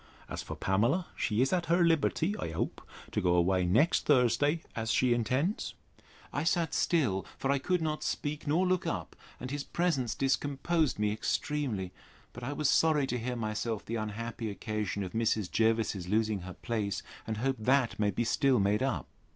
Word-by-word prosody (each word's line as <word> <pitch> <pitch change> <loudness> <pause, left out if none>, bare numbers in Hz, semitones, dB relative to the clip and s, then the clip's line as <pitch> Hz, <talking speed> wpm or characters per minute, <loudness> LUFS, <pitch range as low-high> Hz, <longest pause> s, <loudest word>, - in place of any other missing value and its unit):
As - - -5
for - - -6
Pamela, 115 - +1
she 110 +3 +1
is 135 - 0
at 175 -2 0
her 175 +1 +4
liberty, 165 +3 +2
I - - -3
hope, 80 - -3 0.3
to - - 0
go 90 -1 +3
away 90 +1 +3
next 115 - +3
Thursday, 145 +4 +3
as 115 -1 -2
she 125 +1 +3
intends? 130 - -1 0.6
I 145 - -1
sat 165 -1 +1
still; 125 - +1
for 135 - 0
I 140 - +2
could 180 +4 0
not 155 -1 -1
speak 150 +1 -3
nor 165 +6 +3
look 185 -1 +1
up, - - -3 0.2
and 125 +1 -6
his 145 -1 -2
presence 150 -10 0
discomposed 145 +3 +1
me 105 0 +1
extremely; 110 -3 -2 0.4
but 120 - -9
I 135 - -3
was 150 0 0
sorry 150 -1 +4
to 125 -2 -2
hear 125 +2 -3
myself 110 -1 -2
the 115 - -3
unhappy 110 +1 -4
occasion 105 -1 -3
of 90 - -5
Mrs. 110 -4 0
Jervis's 110 -5 +1
losing 110 +1 +1
her 90 0 -8
place, 105 -4 -2 0.2
and 110 -1 -2
hope 135 +3 0
that 125 +1 +2
may 105 -1 +3
be 100 +4 -1
still 130 +2 +3
made 100 +3 +2
up. 135 +1 0
120 Hz, 185 wpm, -31 LUFS, 105-145 Hz, 0.6 s, her